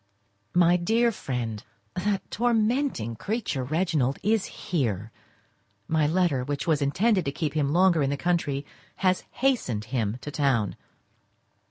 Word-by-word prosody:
My 175 Hz, 0 st, +5 dB
dear 225 Hz, +7 st, +2 dB
Friend,—That 135 Hz, -, -4 dB
tormenting 230 Hz, -, +1 dB
creature, 205 Hz, -, -2 dB
Reginald, 150 Hz, -2 st, 0 dB
is 215 Hz, 0 st, +2 dB
here. 115 Hz, -, -2 dB, 0.8 s
My 155 Hz, -2 st, +2 dB
letter, 160 Hz, -6 st, +1 dB
which 145 Hz, +2 st, -3 dB
was 155 Hz, -3 st, +2 dB
intended 185 Hz, +8 st, +2 dB
to 140 Hz, -, 0 dB
keep 150 Hz, 0 st, -2 dB
him 145 Hz, -2 st, +1 dB
longer 175 Hz, -1 st, +4 dB
in 135 Hz, -, +1 dB
the 140 Hz, -, -1 dB
country, 145 Hz, -5 st, 0 dB, 0.4 s
has 185 Hz, 0 st, +2 dB
hastened 225 Hz, -, 0 dB
him 115 Hz, -3 st, 0 dB
to 145 Hz, -, -6 dB
town. 135 Hz, -, +1 dB
155 Hz, 130 wpm, -26 LUFS, 135-190 Hz, 0.8 s, My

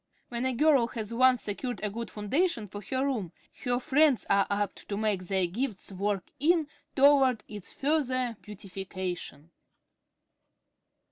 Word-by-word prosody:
When 240 Hz, +1 st, -1 dB
a 260 Hz, -, 0 dB
girl 275 Hz, -2 st, +4 dB
has 225 Hz, -2 st, -5 dB
once 255 Hz, 0 st, +4 dB
secured 245 Hz, +4 st, -3 dB
a 210 Hz, -, -1 dB
good 230 Hz, +2 st, -5 dB
foundation 230 Hz, -, 0 dB
for 205 Hz, +1 st, -8 dB
her 260 Hz, +7 st, -1 dB
room, 225 Hz, -11 st, -2 dB, 0.3 s
her 245 Hz, 0 st, +1 dB
friends 290 Hz, -1 st, +3 dB
are 200 Hz, 0 st, +4 dB
apt 200 Hz, -1 st, -2 dB
to 200 Hz, -, -2 dB
make 205 Hz, -4 st, 0 dB
their 190 Hz, -1 st, +2 dB
gifts 205 Hz, +2 st, -3 dB
work 195 Hz, 0 st, -2 dB
in 325 Hz, +2 st, +3 dB, 0.3 s
toward 270 Hz, -4 st, +5 dB
its 205 Hz, -3 st, -8 dB
further 255 Hz, -5 st, 0 dB
beautification. 185 Hz, -6 st, -6 dB
230 Hz, 140 wpm, -29 LUFS, 200-260 Hz, 0.3 s, toward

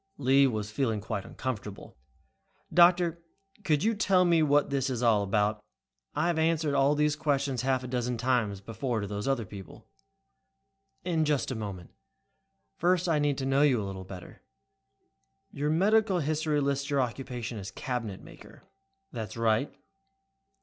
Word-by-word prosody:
Lee 135 Hz, 0 st, +4 dB
was 105 Hz, -4 st, -3 dB
feeling 110 Hz, -5 st, -1 dB
uncomfortable. 105 Hz, 0 st, -5 dB, 0.8 s
"Doctor, 175 Hz, -1 st, +4 dB, 0.4 s
could 155 Hz, -5 st, +1 dB
you 225 Hz, +2 st, +2 dB
tell 195 Hz, -4 st, +3 dB
me 170 Hz, -2 st, +4 dB
what 145 Hz, -1 st, +3 dB
this 135 Hz, -1 st, 0 dB
is 125 Hz, -2 st, -2 dB
all 110 Hz, -3 st, +4 dB
about? 105 Hz, +1 st, 0 dB, 0.5 s
I 155 Hz, +4 st, +1 dB
must -, -, -5 dB
have -, -, +1 dB
answered 150 Hz, -3 st, +2 dB
these 150 Hz, 0 st, +2 dB
questions 140 Hz, -4 st, 0 dB
half 130 Hz, 0 st, 0 dB
a -, -, -5 dB
dozen 125 Hz, -1 st, -2 dB
times 115 Hz, -5 st, 0 dB
before 115 Hz, +2 st, -3 dB
to -, -, -3 dB
those 105 Hz, +2 st, -4 dB
other 135 Hz, -5 st, 0 dB
people." 95 Hz, -1 st, -12 dB, 1.1 s
"In 165 Hz, -3 st, +1 dB
just 150 Hz, -3 st, 0 dB
a -, -, -3 dB
moment. 100 Hz, -5 st, -6 dB, 0.9 s
First 180 Hz, +1 st, +2 dB
I 160 Hz, -3 st, +2 dB
need 145 Hz, -2 st, +1 dB
to 135 Hz, -, -3 dB
know 135 Hz, +1 st, +2 dB
you 140 Hz, -5 st, +4 dB
a 105 Hz, -, -3 dB
little 95 Hz, -1 st, -6 dB
better. 95 Hz, -1 st, -11 dB, 1.1 s
Your 145 Hz, +1 st, -2 dB
medical 200 Hz, +4 st, +3 dB
history 155 Hz, -1 st, 0 dB
lists 140 Hz, 0 st, -1 dB
your 140 Hz, -1 st, +1 dB
occupation 125 Hz, -2 st, -3 dB
as 95 Hz, -, -6 dB
'cabinet 115 Hz, -6 st, -4 dB
maker'." -, -, -15 dB, 0.5 s
"That's 110 Hz, -3 st, -6 dB
right." 115 Hz, +3 st, +1 dB
135 Hz, 155 wpm, -29 LUFS, 110-150 Hz, 1.1 s, Lee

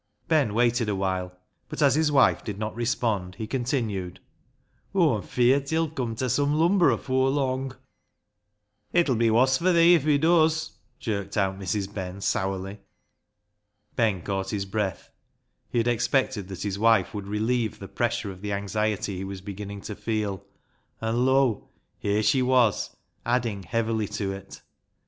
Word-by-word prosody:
Ben 145 Hz, -10 st, +2 dB
waited 120 Hz, -1 st, +2 dB
a 100 Hz, -, 0 dB
while, 95 Hz, -1 st, -2 dB, 0.4 s
but -, -, -6 dB
as 140 Hz, -4 st, +5 dB
his 155 Hz, +1 st, +2 dB
wife 135 Hz, -2 st, +4 dB
did 105 Hz, -3 st, -5 dB
not 110 Hz, +1 st, -3 dB
respond, 110 Hz, -5 st, -1 dB
he 110 Hz, -, -5 dB
continued 115 Hz, -7 st, -2 dB, 0.3 s
— -, -, -42 dB
" -, -, -32 dB
Aw'm 155 Hz, -, +3 dB
feart 130 Hz, +5 st, +2 dB
he'll 160 Hz, -1 st, 0 dB
come 125 Hz, -7 st, -3 dB
ta 130 Hz, +3 st, -2 dB
sum 145 Hz, +4 st, +1 dB
lumber 170 Hz, +3 st, +4 dB
afoor 130 Hz, 0 st, +1 dB
lung." 135 Hz, -1 st, -1 dB, 0.6 s
" 105 Hz, 0 st, -47 dB
It'll 155 Hz, -6 st, +3 dB
be 115 Hz, 0 st, +3 dB
woss 130 Hz, +4 st, +3 dB
fur 185 Hz, +2 st, +3 dB
thee 170 Hz, 0 st, +6 dB
if 165 Hz, -5 st, +3 dB
he 150 Hz, -1 st, +3 dB
does," 160 Hz, 0 st, +3 dB, 0.3 s
jerked 100 Hz, -3 st, -3 dB
out 95 Hz, -1 st, 0 dB
Mrs. 100 Hz, +1 st, -3 dB
Ben 95 Hz, -1 st, -5 dB
sourly. 95 Hz, +1 st, -2 dB, 1.2 s
Ben 105 Hz, -8 st, +1 dB
caught 95 Hz, -1 st, -2 dB
his 100 Hz, -2 st, -2 dB
breath. 95 Hz, -3 st, -3 dB, 0.6 s
He -, -, -3 dB
had 115 Hz, 0 st, +2 dB
expected 120 Hz, -3 st, +1 dB
that 95 Hz, -2 st, -6 dB
his 100 Hz, -1 st, -3 dB
wife 110 Hz, -4 st, +3 dB
would 100 Hz, -2 st, -5 dB
relieve 110 Hz, +2 st, -1 dB
the 95 Hz, -, -9 dB
pressure 100 Hz, 0 st, -2 dB
of 95 Hz, -1 st, -12 dB
the 105 Hz, -, -4 dB
52 100 Hz, 0 st, -1 dB
BECKSIDE -, -, -8 dB
LIGHTS 100 Hz, +1 st, -6 dB
anxiety 105 Hz, -2 st, 0 dB
he 95 Hz, -, -4 dB
was 95 Hz, -1 st, -6 dB
beginning 100 Hz, +1 st, -7 dB
to 105 Hz, -, -6 dB
feel, 105 Hz, -2 st, -2 dB, 0.6 s
and 115 Hz, +3 st, 0 dB
lo! 130 Hz, -5 st, +2 dB, 0.3 s
here 105 Hz, +1 st, 0 dB
she 110 Hz, +5 st, +3 dB
was 125 Hz, -5 st, +2 dB, 0.3 s
adding 120 Hz, -4 st, 0 dB
heavily 110 Hz, +2 st, -1 dB
to 100 Hz, -1 st, -3 dB
it. 95 Hz, 0 st, -10 dB
110 Hz, 170 wpm, -26 LUFS, 100-130 Hz, 1.2 s, thee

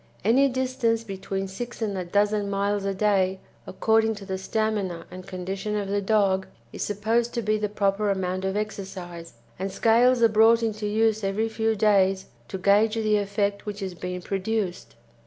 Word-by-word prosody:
Any 265 Hz, +6 st, +4 dB
distance 255 Hz, -3 st, 0 dB
between 195 Hz, -1 st, -4 dB
six 240 Hz, +6 st, -7 dB
and 215 Hz, -3 st, -2 dB
a 185 Hz, -, -2 dB
dozen 205 Hz, +3 st, +1 dB
miles 200 Hz, 0 st, -1 dB
a 195 Hz, -, 0 dB
day, 190 Hz, -2 st, +1 dB, 0.3 s
according 220 Hz, +2 st, +2 dB
to 200 Hz, -1 st, -10 dB
the 190 Hz, -1 st, -4 dB
stamina 195 Hz, -4 st, -2 dB
and 185 Hz, 0 st, -10 dB
condition 195 Hz, +3 st, -4 dB
of 200 Hz, -2 st, -2 dB
the 200 Hz, 0 st, 0 dB
dog, 195 Hz, -2 st, +2 dB, 0.3 s
is -, -, -7 dB
supposed 225 Hz, +4 st, 0 dB
to 235 Hz, -, -1 dB
be 215 Hz, +1 st, +1 dB
the 210 Hz, -1 st, -1 dB
proper 200 Hz, 0 st, 0 dB
amount 185 Hz, -1 st, -1 dB
of 190 Hz, +1 st, -1 dB
exercise, 185 Hz, -5 st, -6 dB, 0.3 s
and 190 Hz, +1 st, -3 dB
scales 235 Hz, +4 st, +4 dB
are -, -, +8 dB
brought 225 Hz, +1 st, +5 dB
into 215 Hz, -1 st, -2 dB
use 220 Hz, 0 st, +1 dB
every 200 Hz, +3 st, 0 dB
few 220 Hz, 0 st, 0 dB
days 195 Hz, -2 st, +3 dB, 0.2 s
to 190 Hz, -, -5 dB
gauge 205 Hz, +4 st, +3 dB
the 215 Hz, -2 st, +2 dB
effect 200 Hz, 0 st, -1 dB
which 205 Hz, -1 st, -4 dB
is 190 Hz, -1 st, -4 dB
being 180 Hz, 0 st, -6 dB
produced. 195 Hz, -1 st, -3 dB
205 Hz, 175 wpm, -25 LUFS, 190-220 Hz, 0.3 s, are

